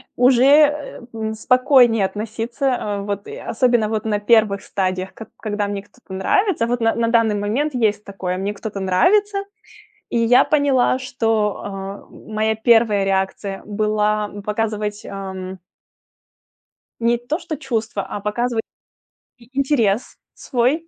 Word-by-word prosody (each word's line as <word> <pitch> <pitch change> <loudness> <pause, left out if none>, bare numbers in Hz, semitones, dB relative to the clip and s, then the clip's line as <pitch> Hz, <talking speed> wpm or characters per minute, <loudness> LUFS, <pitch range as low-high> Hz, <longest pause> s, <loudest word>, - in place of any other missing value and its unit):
уже, 250 0 +4
э, 295 0 +4
м, 220 -1 -3
спокойнее 245 -2 +4
относиться, 230 +6 -2
а, 205 -1 -3
вот, 200 0 -4
и - - -7
особенно 235 -2 +1
вот 220 0 -2
на 210 -2 0
1 205 -2 +3
стадиях, 185 -1 -2
как 225 - -10
когда 210 -2 -2
мне 200 -1 -4
кто-то 205 0 -15
нравится. 295 - +1
Вот 245 +1 -1
на 225 -1 +2
на 230 0 +1
данный 230 -2 +3
момент 240 +9 -1
есть 215 -4 +1
такое: 190 -3 -4
мне 200 +2 -2
кто-то 210 -1 -6
нравится. 395 - +2 0.7
И - - -1
я 230 +2 +5
поняла, 275 -4 +2
что, 225 -5 -1
э, - - -4 0.5
м 220 - -13
моя 220 +1 +1
1 220 -3 +3
реакция 195 0 -1
была 210 0 0 0.2
показывать, 210 -1 -2
ам 190 -1 -6 1.4
Не 235 +1 +2
то 245 +7 -3
что 335 -3 -5
чувства, 230 -7 -3
а 205 - -6
показывать 225 +2 -1 0.8
и 235 0 -20
интерес 250 -6 +1 0.2
свой. 270 +7 0
220 Hz, 140 wpm, -20 LUFS, 205-245 Hz, 1.4 s, я